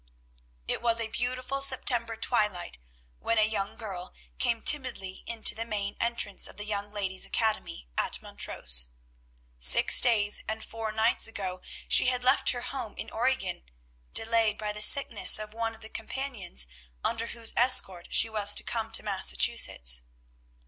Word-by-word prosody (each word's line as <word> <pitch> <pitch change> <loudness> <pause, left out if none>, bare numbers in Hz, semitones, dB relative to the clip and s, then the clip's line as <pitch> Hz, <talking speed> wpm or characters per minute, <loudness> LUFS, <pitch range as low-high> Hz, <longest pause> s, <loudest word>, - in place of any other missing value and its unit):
It - - -1
was 230 -1 +1
a 225 -1 -4
beautiful 255 +3 -4
September 245 -4 +3
twilight 210 - -2 0.4
when 230 - -1
a 215 0 +3
young 200 -2 -4
girl 190 -6 -8 0.2
came 235 -2 -1
timidly 245 -10 +3
into 230 -2 +2
the 225 - -5
main 205 -3 -4
entrance 235 -4 0
of - - -15
the 210 - -5
Young 205 -1 -5
Ladies' 195 -2 -3
Academy 215 - -3
at - - -1
Montrose. - - -1 0.7
Six 60 0 +6
days 210 -4 +1
and 220 0 -5
four 225 -1 -6
nights 220 +2 +1
ago 190 -4 -6 0.3
she - - +5
had 250 -1 -1
left 260 +2 +3
her 245 - -1
home 255 -4 -7
in - - -7
Oregon, 230 - -2 0.5
delayed 225 -1 +1
by 210 -1 -4
the 210 - -6
sickness 230 -1 +6
of 215 0 -7
one 225 0 -4
of 220 - -20
the 220 - -9
companions 225 - -5 0.4
under 230 0 -2
whose 230 -1 -3
escort 195 -8 +2
she - - +5
was 210 -2 +1
to - - +4
come 225 -1 -4
to - - +2
Massachusetts. 125 - +1
220 Hz, 155 wpm, -27 LUFS, 200-235 Hz, 0.7 s, Six